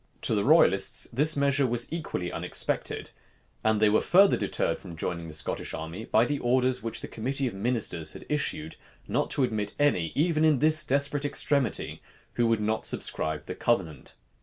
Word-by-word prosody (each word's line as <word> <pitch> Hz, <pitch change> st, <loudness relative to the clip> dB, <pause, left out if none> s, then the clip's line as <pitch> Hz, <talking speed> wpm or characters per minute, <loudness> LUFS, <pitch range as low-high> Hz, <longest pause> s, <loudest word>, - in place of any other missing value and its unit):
To -, -, +2 dB
the -, -, +1 dB
royalists, -, -, +4 dB
this 150 Hz, +5 st, +2 dB
measure 140 Hz, -1 st, +2 dB
was 120 Hz, 0 st, 0 dB
equally 150 Hz, -, -4 dB
unexpected; -, -, -3 dB, 0.5 s
and 110 Hz, -1 st, +2 dB
they 110 Hz, -, +4 dB
were 105 Hz, +1 st, +3 dB
further 195 Hz, +2 st, +5 dB
deterred -, -, -1 dB
from 85 Hz, -, -10 dB
joining 85 Hz, 0 st, -4 dB
the 80 Hz, -, -8 dB
Scottish 80 Hz, -, -2 dB
army 80 Hz, +7 st, -7 dB
by 110 Hz, +2 st, +3 dB
the 145 Hz, +2 st, -2 dB
orders 125 Hz, +1 st, +1 dB
which 115 Hz, 0 st, -3 dB
the -, -, -6 dB
committee 135 Hz, +5 st, -2 dB
of 120 Hz, -, -2 dB
ministers 100 Hz, -7 st, -2 dB
had -, -, -11 dB
issued, 80 Hz, -, -3 dB, 0.3 s
not -, -, -1 dB
to 140 Hz, -, +1 dB
admit 105 Hz, -4 st, -2 dB
any, 130 Hz, -, +1 dB
even 155 Hz, +1 st, +1 dB
in 155 Hz, -3 st, +4 dB
this 155 Hz, +2 st, +3 dB
desperate 140 Hz, +1 st, 0 dB
extremity, 140 Hz, -2 st, -1 dB, 0.3 s
who 120 Hz, -1 st, +1 dB
would 115 Hz, -2 st, +1 dB
not 110 Hz, +1 st, -1 dB
subscribe 80 Hz, -1 st, -2 dB
the -, -, -5 dB
covenant. 85 Hz, -, -2 dB
120 Hz, 180 wpm, -27 LUFS, 100-140 Hz, 0.5 s, further